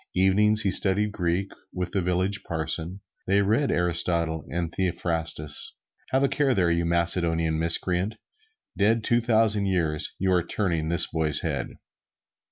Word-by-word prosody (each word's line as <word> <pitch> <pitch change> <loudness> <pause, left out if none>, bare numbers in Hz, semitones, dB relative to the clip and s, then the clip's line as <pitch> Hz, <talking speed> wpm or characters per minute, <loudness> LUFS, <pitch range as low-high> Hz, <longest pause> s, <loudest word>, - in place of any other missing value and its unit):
Evenings 105 +3 +3
he 100 - +1
studied 105 +2 +1
Greek 90 0 -2 0.2
with 90 -1 -4
the 95 - 0
village 90 +3 -1
parson. 85 +3 -3 0.3
They 100 +1 +3
read 115 +7 +1
Aristotle 85 -3 0
and 85 -1 -3
Theophrastus. 80 -4 -2 0.3
Have 130 +1 +1
a - - +4
care 135 -2 +1
there, 90 -3 +2
you 85 0 0
Macedonian 85 -2 +1
miscreant, 90 +5 +1 0.6
dead 110 +2 +2
two 120 +2 +2
thousand 110 -3 +2
years, 80 -5 -1
you 95 0 0
are 90 - +3
turning 85 -4 -2
this 85 -1 +4
boy's 80 -2 0
head! - - -3
90 Hz, 145 wpm, -25 LUFS, 85-100 Hz, 0.6 s, a